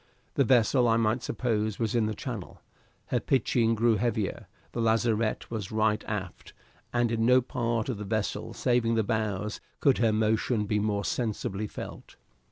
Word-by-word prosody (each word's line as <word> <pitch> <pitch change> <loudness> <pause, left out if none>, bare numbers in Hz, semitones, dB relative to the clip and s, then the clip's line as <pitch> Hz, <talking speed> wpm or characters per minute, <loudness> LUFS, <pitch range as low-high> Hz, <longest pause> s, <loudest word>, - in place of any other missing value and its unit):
The 140 - +3
vessel, 125 0 +4
I 115 0 +4
might 115 +2 +1
suppose, 110 -4 -1
was 115 0 -1
in 115 -3 +2
the 110 - -3
Channel; 115 -9 -6 0.5
her - - +1
pitching 120 -3 +2
grew 115 0 +3
heavier, 110 -2 -1 0.2
the 120 - -3
lazarette 115 -1 +1
was 105 -5 -4
right 110 -1 +1
aft, 100 -4 -5 0.4
and 120 -1 +1
in 115 -1 0
no 125 +2 +6
part 115 -2 -1
of 120 -6 -3
the - - -4
vessel 110 +1 -2
saving 120 -2 +2
the 110 - +2
bows 105 -1 -2 0.2
could 140 -3 +3
her 115 -2 +3
motion 110 +1 +1
be 105 0 0
more 100 -1 -1
sensibly 105 -3 -2
felt. - - -9
110 Hz, 170 wpm, -28 LUFS, 105-120 Hz, 0.5 s, no